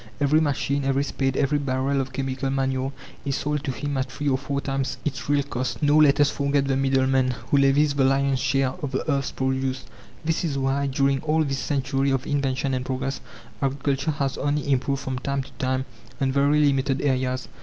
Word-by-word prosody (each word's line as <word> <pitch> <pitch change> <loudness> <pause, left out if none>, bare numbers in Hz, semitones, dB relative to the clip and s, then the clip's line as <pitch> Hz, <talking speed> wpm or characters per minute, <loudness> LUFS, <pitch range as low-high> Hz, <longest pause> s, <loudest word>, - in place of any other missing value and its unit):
Every 145 +2 +3
machine, 140 -1 0
every 135 +1 +1
spade, 135 -2 -1
every 145 +2 +2
barrel 135 0 0
of 135 0 -5
chemical 135 0 -2
manure, 135 0 -1 0.3
is 140 -2 -1
sold 150 0 -2
to 135 - 0
him 145 +2 -3
at 130 - -2
three 145 - -4
or 130 - +3
four 140 0 -2
times 135 -1 -2
its 140 -1 -3
real 145 -1 +3
cost. 130 +2 -3
Nor 145 +1 +5
let 140 -2 +5
us 145 -1 +4
forget 140 0 +1
the 135 -1 +1
middleman, 130 -1 +2 0.2
who 140 - +5
levies 140 +2 +4
the 140 -1 +2
lion's 135 0 +2
share 135 0 +1
of 145 - -2
the 130 - -2
earth's 140 -1 0
produce. 130 0 -1 0.4
This 165 +1 0
is 150 -5 -1
why, 135 +1 0
during 135 0 +1
all 155 +1 +2
this 135 -2 -2
century 135 0 0
of 135 0 0
invention 135 -1 0
and 130 -1 -1
progress, 135 +1 -3 0.4
agriculture 140 +1 0
has 140 -3 -1
only 145 0 0
improved 135 +1 0
from 130 -1 -3
time 140 +1 -2
to - - -15
time 130 0 0 0.3
on 135 -1 +1
very 145 +2 +3
limited 135 -1 +1
areas. 130 -2 0
135 Hz, 200 wpm, -24 LUFS, 130-140 Hz, 0.4 s, Nor